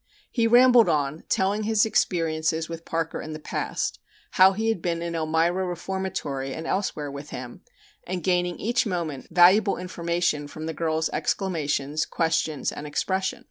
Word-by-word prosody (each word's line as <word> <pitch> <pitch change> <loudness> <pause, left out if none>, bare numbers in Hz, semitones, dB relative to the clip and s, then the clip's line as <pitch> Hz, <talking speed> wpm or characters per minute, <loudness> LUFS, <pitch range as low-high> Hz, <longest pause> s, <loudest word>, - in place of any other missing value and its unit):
He 230 -2 +2
rambled 245 0 +6
on, 145 +1 -1
telling 195 +3 +1
his 215 0 +3
experiences 160 -5 0
with 165 0 -8
Parker 165 0 -2
in 155 - -7
the 155 - -6
past, - - -3 0.3
how 190 +1 +6
he 220 +3 -1
had 220 -6 -1
been 170 -1 -2
in 170 0 -3
Elmira 165 +3 +1
Reformatory 175 -7 -3
and 160 - -6
elsewhere 155 -7 -2
with 140 +2 -8
him, 125 -1 -8 0.5
and 180 -1 -3
gaining 180 -1 +1
each 240 +2 0
moment 165 -8 -3
valuable 185 +4 +5
information 170 -4 -1
from 155 +2 -8
the 160 - -3
girl's 160 0 -1
exclamations, 155 -5 -1
questions, 160 -3 0
and 150 - -7
expression. 190 +6 -1
170 Hz, 155 wpm, -25 LUFS, 155-190 Hz, 0.5 s, rambled